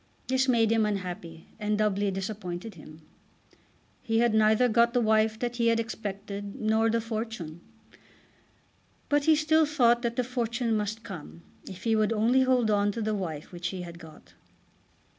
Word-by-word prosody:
This 260 0 +2
made 230 -3 +3
him 225 -1 +3
unhappy, 180 -5 -4
and 210 0 0
doubly 205 -1 +1
disappointed 195 0 -5
him. 155 -1 -14 1.0
He 225 -2 -1
had 235 -1 +3
neither 220 +3 +4
got 235 +1 +3
the - - +4
wife 220 -1 +2
that 240 +1 -3
he 235 -1 +2
had 230 0 +3
expected 205 -2 -5
nor 220 +1 +2
the 230 +1 +1
fortune. 220 -8 -5 1.5
But 290 -1 +2
he 315 - +6
still 310 +1 +3
thought 240 -5 +3
that 235 -1 -2
the 250 - +1
fortune 240 -1 -1
must 215 +1 -3
come 170 -5 -9 0.3
if 190 0 -10
he 225 -1 +2
would 215 +1 +2
only 230 +4 +3
hold 255 -4 +2
on 205 0 +2
to 230 - -4
the 215 0 -1
wife 165 -7 -5
which 175 -1 -4
he 185 0 -5
had 170 -1 -10
got. 160 -2 -15
220 Hz, 170 wpm, -28 LUFS, 195-235 Hz, 1.5 s, he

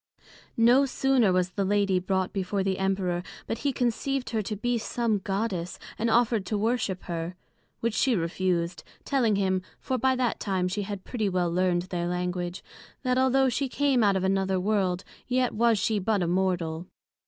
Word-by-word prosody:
No 245 +4 +5
sooner 265 -6 +2
was 180 0 +1
the 200 - -1
Lady 200 -1 +2
brought 190 0 -1
before 195 0 -1
the 190 -1 -1
Emperor, 190 -2 0 0.2
but 225 - -3
he 280 - 0
conceived 250 +2 -1
her 220 -2 0
to 210 +1 -4
be 245 +3 0
some 225 -2 0
Goddess, 195 -2 -2 0.2
and 230 +2 0
offered 230 -2 +3
to 210 - 0
worship 215 -3 -1
her; 170 +1 -4 0.5
which 230 -1 0
she 255 +2 +2
refused, 175 0 -1 0.2
telling 245 -7 +2
him, 190 -1 +1 0.2
(for 260 -1 -2
by 260 +2 +3
that 250 -2 0
time 190 -3 0
she 195 +3 -2
had 200 -1 -5
pretty 220 -5 -1
well 180 -2 0
learned 175 0 +1
their 175 -1 -3
Language) 180 0 -3 0.4
that 255 -1 +2
although 265 +1 +4
she 260 +2 -1
came 275 -3 +2
out 200 -2 +4
of 190 - 0
another 190 0 +1
world, 190 -2 0 0.2
yet 255 0 +1
was 230 0 +3
she 215 +1 +1
but 200 -1 +1
a - - 0
mortal. 175 -2 0
200 Hz, 180 wpm, -27 LUFS, 185-235 Hz, 0.5 s, No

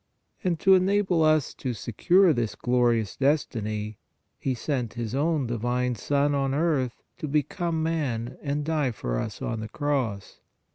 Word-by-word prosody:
And 175 -4 0
to 195 - +6
enable 190 -2 +3
us 155 -2 +3
to 125 -3 -4
secure 175 - +3
this 120 -4 -1
glorious 120 -4 +1
destiny, 110 -7 -1 0.4
He 130 -2 -1
sent 125 -2 -2
His 115 -2 -4
own 150 0 +1
Divine 120 +2 -1
Son 145 +5 +1
on 135 -1 0
earth 145 -6 0 0.2
to 155 - -3
become 160 +3 -1
man 130 -7 -2
and 145 0 -2
die 155 -4 +1
for - - -3
us - - -5
on 115 - -2
the 110 0 -5
cross. 130 -9 -2
135 Hz, 150 wpm, -26 LUFS, 120-155 Hz, 0.4 s, to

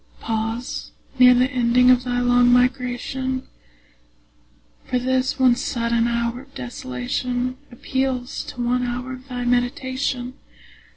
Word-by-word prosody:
Pause 225 +3 -3 0.3
near 250 0 +8
the 255 +2 +2
ending 250 0 +4
of 250 0 +4
thy 245 0 0
long 245 0 +4
migration; 255 +1 0 1.4
For 250 - 0
this 260 +2 0
one 260 -2 +5
sudden 235 -1 0
hour 235 +1 -1
of 275 +1 -20
desolation 245 - -3 0.2
Appeals 260 0 -2
to 245 - -5
one 250 +1 +1
hour 250 +1 -3
of 255 +1 -11
thy 245 -2 -4
meditation. 250 +1 -1
250 Hz, 120 wpm, -22 LUFS, 245-255 Hz, 1.4 s, near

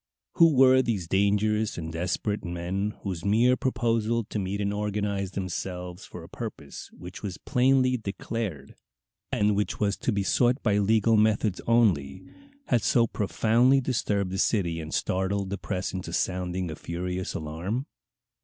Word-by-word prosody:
Who 165 -4 +6
were 130 0 +6
these 105 -9 -2
dangerous 105 +3 +1
and 80 0 -5
desperate 90 +5 -2
men 90 +4 -3
whose 90 -4 -4
mere 115 +5 +4
proposal 115 -3 0
to 105 - -2
meet 100 +1 -3
and 100 0 -1
organize 100 -2 -2
themselves 90 -1 -5
for 90 - -10
a - - -11
purpose 100 - -8
which 90 +1 -10
was 95 -4 -5
plainly 130 -1 +2
declared, 100 - -5 0.6
and 105 0 +2
which 105 +1 -1
was 100 -1 +1
to - - -1
be 100 -2 0
sought 125 +6 +2
by 105 -3 +2
legal 110 +2 +3
methods 105 -2 +2
only, 95 -9 +2 0.4
had 120 -3 +2
so 115 +5 +3
profoundly 115 +5 +2
disturbed 105 -7 -1
the 95 - -3
city 85 -7 +1
and 80 -1 -7
startled 95 +1 -1
the 100 - -3
press 95 -2 -3
into 95 -1 -5
sounding 90 -1 -1
a - - -6
furious 90 +3 -4
alarm? 85 - -3
100 Hz, 155 wpm, -27 LUFS, 90-115 Hz, 0.6 s, Who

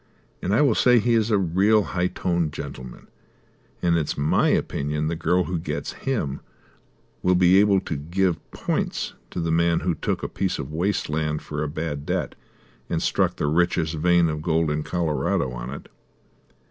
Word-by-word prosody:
And 95 - -2
I 110 - +4
will 140 -6 +4
say 125 +2 +5
he 120 +1 +2
is 110 -1 +2
a 105 - +3
real 100 +4 +3
high 90 -2 -1
toned 85 -4 -1
gentleman, 65 -4 -8 0.8
and 85 -1 +3
it's 80 -3 -1
my 70 +2 +2
opinion 75 +2 -1
the 85 - -2
girl 90 +2 +1
who 90 -1 -3
gets - - -4
him 95 - -2 0.8
will 90 0 +3
be 90 +1 +5
able 100 -1 +4
to 80 - -4
give 85 +4 -1
points - - -2 0.2
to - - -5
the 85 -1 -1
man 85 +1 +2
who 90 - 0
took - - -3
a - - -1
piece 95 -1 -2
of 75 +1 -6
waste 95 +6 0
land 75 0 -2
for 75 0 -4
a 75 - -1
bad 75 -1 -4
debt, - - -1 0.6
and - - 0
struck - - +1
the - - -2
richest 80 +1 +1
vein 85 +2 +3
of 75 -1 -3
gold 80 -1 +1
in 75 0 -1
Colorado 75 -5 -1
on - - -6
it." 70 - -8
85 Hz, 185 wpm, -24 LUFS, 75-90 Hz, 0.8 s, say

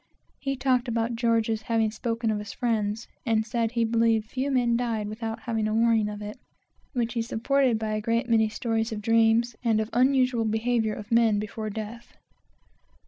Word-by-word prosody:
He 275 -1 -2
talked 255 -1 +1
about 230 0 -1
George's 230 -2 +1
having 225 -1 +1
spoken 230 0 -2
of 210 - -1
his 210 - -7
friends, 220 -2 -1 0.2
and 220 -1 +1
said 230 0 -1
he 235 -1 +2
believed 225 -1 +2
few 265 +2 -1
men 245 -3 +2
died 230 -3 -1
without 225 +1 -5
having 225 -3 -1
a 215 - -1
warning 225 -2 +3
of 210 0 -6
it, 210 +1 -7 0.5
which 235 -3 -1
he 235 - 0
supported 245 +2 +1
by 220 -1 -2
a 215 - -1
great 230 +3 0
many 220 -2 +3
stories 225 0 -1
of 215 - -3
dreams, 225 +1 +3
and 225 -2 +2
the 220 - -1
unusual 255 -2 +3
behavior 220 0 0
of 210 +2 -9
men 230 -2 +4
before 215 +1 -4
death. 220 +3 -8
225 Hz, 185 wpm, -26 LUFS, 220-235 Hz, 0.5 s, men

